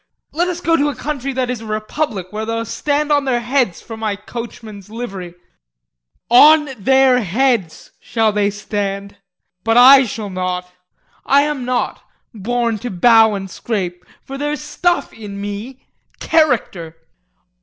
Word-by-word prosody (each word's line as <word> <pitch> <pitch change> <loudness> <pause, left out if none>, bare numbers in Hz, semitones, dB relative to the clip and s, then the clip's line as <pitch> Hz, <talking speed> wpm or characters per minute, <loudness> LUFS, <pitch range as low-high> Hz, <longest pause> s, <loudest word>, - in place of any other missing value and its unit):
Let 345 +3 0
us 350 -1 -4
go 330 -1 +2
to 290 0 +1
a 285 - -5
country 275 -2 -4
that 255 -1 -1
is 245 -3 -5
a - - -9
republic 215 - -3
where 215 +1 -3
they'll 230 +1 -3
stand 295 +5 -1
on 285 -1 +2
their 250 -3 +1
heads 245 -7 0
for 225 - -8
my 220 -2 -2
coachman's 215 -2 -9
livery 195 -6 -7 0.9
on 300 +5 +6
their 265 +3 +4
heads 215 -3 -1
shall 225 -2 0
they 205 -1 +1
stand 200 -1 -4 0.5
but 225 +1 +2
I 265 +2 +8
shall 210 -1 -6
not. 180 -1 -3 0.5
I 280 +1 +4
am 295 -4 -3
not 250 0 -2 0.3
born 230 +1 -1
to 245 - -5
bow 220 +2 +4
and 195 -1 -5
scrape, 180 -3 -4 0.2
for 275 0 -8
there's 295 +1 -2
stuff 350 -1 -1
in 205 -3 -8
me 205 +6 -7 0.3
character. 225 - 0
230 Hz, 150 wpm, -18 LUFS, 200-270 Hz, 0.9 s, I